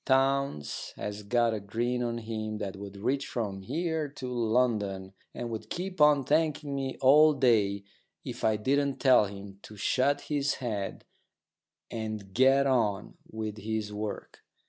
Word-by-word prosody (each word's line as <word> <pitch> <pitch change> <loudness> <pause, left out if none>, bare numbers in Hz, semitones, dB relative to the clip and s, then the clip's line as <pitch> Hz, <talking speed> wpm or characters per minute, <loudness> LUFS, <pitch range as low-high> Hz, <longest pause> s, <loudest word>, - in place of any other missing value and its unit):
Townes 135 - 0
has 105 0 -5
got 115 +2 +2
a 110 - -2
grin 120 +5 -2
on 120 -1 -1
him 110 -1 -4
that 100 -2 -4
would 100 0 -9
reach 135 +7 -1
from 100 -5 -3
here 160 - -2
to 135 -2 -8
London, 110 -5 0 0.2
and 120 -1 -4
would 110 -1 -6
keep 185 -1 -4
on 150 -2 +6
thanking 150 0 +1
me 135 -1 -3
all 150 +4 +7
day 110 -7 +2 0.4
if - - -6
I 110 -1 +3
didn't 140 +5 +1
tell 130 -5 +6
him 100 0 -9
to 105 - -12
shut 135 +7 +1
his 145 -1 -1
head 105 -6 -4 0.9
and 110 -3 -5
get 135 +3 +5
on 110 -7 0
with 110 -1 -5
his 105 0 -3
work. 105 0 -5
115 Hz, 150 wpm, -29 LUFS, 105-135 Hz, 0.9 s, all